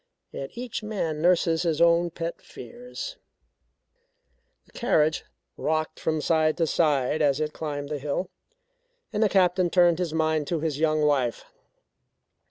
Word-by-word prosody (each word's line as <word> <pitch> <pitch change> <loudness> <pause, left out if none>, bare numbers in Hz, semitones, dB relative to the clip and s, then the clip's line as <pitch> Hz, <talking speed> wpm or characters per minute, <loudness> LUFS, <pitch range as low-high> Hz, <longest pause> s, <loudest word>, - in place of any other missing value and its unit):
Yet 135 - -6
each 240 -1 -5
man 180 -8 -3
nurses 170 -1 +3
his 165 -3 0
own 170 +1 +4
pet 170 0 -5
fears." 250 - -9 1.5
The - - -25
carriage 155 -9 +1 0.3
rocked 155 0 -1
from 155 -1 -1
side 155 -1 +2
to 165 - +2
side 150 -2 +1
as 145 -1 +2
it 155 0 -2
climbed 145 -2 -5
the 150 -1 -3
hill, 145 +6 -3 0.8
and 210 - -1
the 215 - +4
Captain 185 -2 +3
turned 175 -1 +4
his 175 -3 -1
mind 155 -2 0
to 170 - -1
his 150 -2 -2
young 155 -1 +2
wife. 135 -5 0
160 Hz, 145 wpm, -26 LUFS, 150-175 Hz, 1.5 s, own